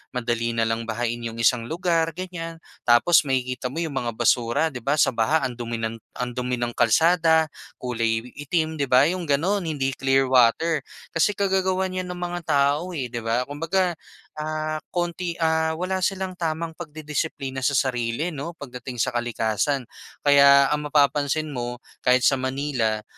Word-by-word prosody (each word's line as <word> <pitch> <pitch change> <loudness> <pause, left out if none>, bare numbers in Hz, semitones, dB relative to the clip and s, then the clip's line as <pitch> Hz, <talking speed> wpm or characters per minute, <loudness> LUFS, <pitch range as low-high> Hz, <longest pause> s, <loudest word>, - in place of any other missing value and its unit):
madali 115 -1 -1
na 115 - +2
lang 115 +1 -2
bahain 120 +1 -2
'yong 115 0 -5
isang 115 0 +2
lugar, 165 -1 +1
ganyan. 165 -3 -6 0.3
Tapos 135 +8 +6
makikita 125 -1 -1
mo 155 - -8
'yong 160 -4 -4
mga 120 -3 -2
basura 120 +5 +2
'di 125 - -5
ba, 140 +4 +2
sa - - +4
baha 135 +7 +2
ang 125 - -7
dumi 120 0 -3
ng 115 0 -3 0.2
ang 125 0 -2
dumi 125 0 -2
ng 120 0 -2
kalsada, 160 +6 +4 0.3
kulay 115 -2 -1
itim, 155 +2 -1
'di 140 - 0
ba, 130 +2 +6
'yong 180 +2 -1
gano'n 175 +5 +1
hindi 135 -3 -1
clear 135 0 +2
water. 140 +6 +4 0.3
Kasi 185 +5 +2
kagagawan 190 -1 +1
'yan 185 0 -3
ng 180 - -5
mga 175 0 -3
tao, 150 +4 +1
eh, 125 -5 -4
'di 120 - -3
ba? 115 +2 0
Kumbaga 165 +6 0 0.5
ah, 155 0 -2
konti 175 0 -2
ah 160 0 +2
wala 185 +3 -2
silang 190 0 -1
tamang 165 0 -2
pagdidisiplina 150 -4 -4
sa 140 - +2
sarili 125 +5 0
'no, 160 +3 -6
pagdating 125 -3 -8
sa - - +1
kalikasan. 120 +3 0 0.4
Kaya 140 -1 +6
ang 150 0 -1
mapapansin 145 +1 +2
mo 120 -1 -5 0.2
kahit 125 0 +4
sa 135 - +4
Manila, 130 -5 -1
140 Hz, 165 wpm, -24 LUFS, 125-165 Hz, 0.5 s, Tapos